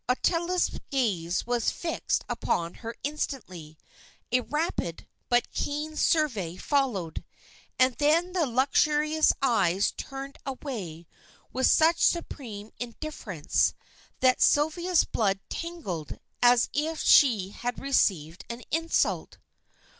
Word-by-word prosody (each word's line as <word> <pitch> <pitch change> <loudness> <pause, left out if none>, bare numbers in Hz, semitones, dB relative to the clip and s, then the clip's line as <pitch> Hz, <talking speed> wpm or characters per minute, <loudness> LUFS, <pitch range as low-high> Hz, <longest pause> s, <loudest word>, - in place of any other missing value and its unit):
Ottila's 345 +7 +1
gaze 190 -10 0
was 240 -1 +1
fixed 335 - -2
upon 170 0 -1
her 230 0 -6
instantly; 185 - -5 0.5
a 250 - +4
rapid, 300 - -3 0.2
but 245 0 +2
keen 300 +2 -3
survey 230 - +1
followed, 240 - -1 0.5
and 255 0 +4
then 325 +5 +2
the 340 -5 +1
lustrous 300 +5 +3
eyes 200 -7 +2
turned 275 +1 -7
away 215 - -6 0.5
with 260 +1 +2
such 330 +1 +4
supreme 225 -11 -1
indifference, 235 - -2 0.5
that 255 -1 +4
Sylvia's 330 +4 +3
blood 195 -3 0
tingled 305 - -5 0.2
as 245 -1 +5
if 315 +2 -1
she 220 -9 +5
had 245 +4 -4
received 185 - 0
an 235 +1 -6
insult. 330 +2 0
255 Hz, 105 wpm, -27 LUFS, 200-305 Hz, 0.5 s, as